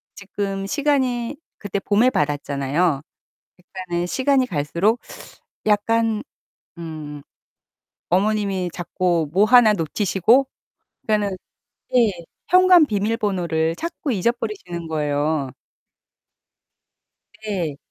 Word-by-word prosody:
지금 195 -1 -4
시간이 260 -1 0 0.2
그때 200 -1 -4
봄에 210 +5 +3
받았잖아요. 145 - 0 0.6
그러니까는 180 -1 -5
시간이 260 +4 +2
갈수록 175 - 0 0.7
약간 220 +1 +1 0.6
음 155 -3 -7 0.9
어머님이 195 -1 0
자꾸 175 -3 -1
뭐 200 +3 +4
하나 230 -1 +6
놓치시고 205 - +2 0.6
그러니까는 205 -3 0 0.6
예. 230 -4 +5 0.4
현관 365 -3 +6
비밀번호를 195 - -1
자꾸 320 - -4
잊어버리시는 195 -5 -3
거예요. 150 -2 -1 1.9
네. 170 -9 -3
195 Hz, 220 characters per minute, -21 LUFS, 165-225 Hz, 1.9 s, 하나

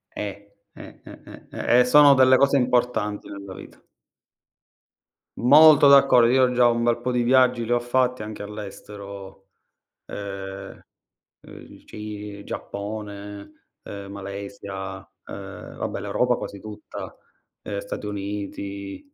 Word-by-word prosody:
Eh, 100 0 -7 0.2
eh, - - -13
eh, - - -13
eh, - - -14
eh. 120 - +2
E 125 - +5
sono 145 +2 +7
delle 130 -1 +5
cose 140 +1 +3
importanti 125 -4 0
nella 100 -1 -9
vita. - - -14 1.5
Molto 150 +3 +7
d'accordo. 135 -4 +6
Io 130 0 +3
già 120 -1 +4
un 120 0 +1
bel 120 0 +1
po' 125 +1 -2
di 125 -1 +1
viaggi 125 -1 +3
li 120 - -5
ho 120 - +3
fatti 125 0 0
anche 105 -1 -7
all'estero. 100 -1 -10 0.6
Ehm, 95 -1 -8 0.6
uhm, - - -16
il - - -15
Ci 105 -1 -8
Giappone, 100 0 -7 0.3
uhm, 100 -1 -8
Malesia, 100 -1 -7 0.3
uhm, 100 -1 -9
vabbè - - -4
l'Europa 125 0 0
quasi 100 -4 -8
tutta. 105 -1 -9 0.5
Ehm, 100 - -4
Stati 100 - -7
Uniti, 100 - -6
105 Hz, 130 wpm, -23 LUFS, 100-125 Hz, 1.5 s, sono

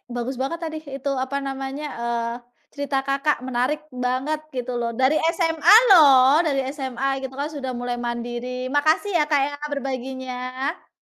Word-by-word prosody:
bagus 245 +2 -3
banget 335 +5 -2
tadi 315 -1 -4
itu, 275 -1 -5
apa 280 +1 -3
namanya, 270 +2 -5
eee, 235 0 -2 0.4
cerita 285 -1 -2
Kakak. 275 +2 +1
Menarik 260 +4 0
banget 255 +5 -1 0.2
gitu 250 0 -3
loh, 235 0 -1
dari 260 +5 +3 0.2
SMA 330 +1 +4 0.2
loh! 280 -3 +7
Dari 275 -2 +1 0.2
SMA 265 -1 -3 0.2
gitu, 265 0 -5
kan, 295 +2 -2
sudah 265 -4 -4
mulai 245 0 -3
mandiri. 240 +1 -4
Makasih, 315 +7 +2
ya, 300 - +3
Kak, 285 -2 +4
ya, 290 - -6 0.2
berbaginya. 260 +1 -4
265 Hz, 155 wpm, -23 LUFS, 250-290 Hz, 0.4 s, loh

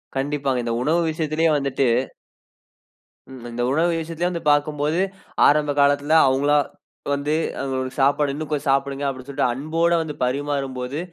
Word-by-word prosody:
கண்டிப்பாங்க. 135 -2 -1
இந்த 115 -1 -2
உணவு 160 +6 +2
விஷயத்திலேயே 160 +1 0
வந்துட்டு 135 -1 0 1.4
ம், 130 -2 -11
இந்த 120 +1 -4
உணவு 165 +5 +2
விஷயத்திலே 165 +2 -2
வந்து 170 -2 -5
பாக்கும்போது, 150 +2 0 0.5
ஆரம்ப 150 0 +2
காலத்துல 145 +2 +2
அவுங்களா 140 +3 +2 0.6
வந்து 145 +2 -1 0.6
சாப்பாடு 140 +1 +2
இன்னும் 155 +2 -5
கொஞ்ச 145 -2 -1
சாப்புடுங்க! 140 +1 0
அப்பிடி 130 -1 -8
சொல்ட்டு 140 0 0
அன்போட 160 +6 0
வந்து 155 -2 -5
பரிமாறும் 135 0 -2
போது 125 +4 -4
145 Hz, 135 wpm, -22 LUFS, 135-155 Hz, 1.4 s, உணவு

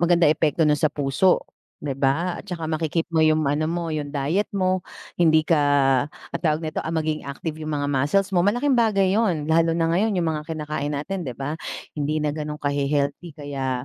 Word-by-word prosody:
maganda 175 0 +4
epekto 155 +1 +3
no'n 150 -1 +2
sa 155 - +4
puso, 145 +5 +1 0.4
'di 145 - -1
ba? 160 +7 +1
At 205 - -17
saka 170 -3 -4
maki-keep 160 +1 -1
mo 160 - +3
yung 155 0 +3
ano 145 +3 0
mo, 170 -1 -2
yung 150 -2 -3
diet 150 +8 -1
mo. 185 -1 +1 0.4
Hindi 160 -2 +5
ka, 160 -2 +3 0.5
ang - - -9
tawag 160 -1 0
nito, 155 - -3
ah - - -5
maging 155 -2 -2
active 155 +3 -5
yung 155 -1 -3
mga 145 0 -1
muscles 170 +9 +1
mo. 180 - +3
Malaking 245 +9 +2
bagay 205 -6 +3
'yon. 195 -9 +1
Lalo 165 +1 +2
na 165 -1 +1
ngayon 200 +3 +1
yung 175 - +1
mga 150 +1 -5
kinakain 150 -2 -3
natin 175 +2 -4
di 125 - -6
ba? 140 +2 -3 0.4
Hindi 150 +1 -1
na 150 - 0
ganong 150 0 -4
kahe-healthy 145 +3 -1
kaya 135 -4 -3
155 Hz, 200 wpm, -23 LUFS, 145-175 Hz, 0.5 s, Hindi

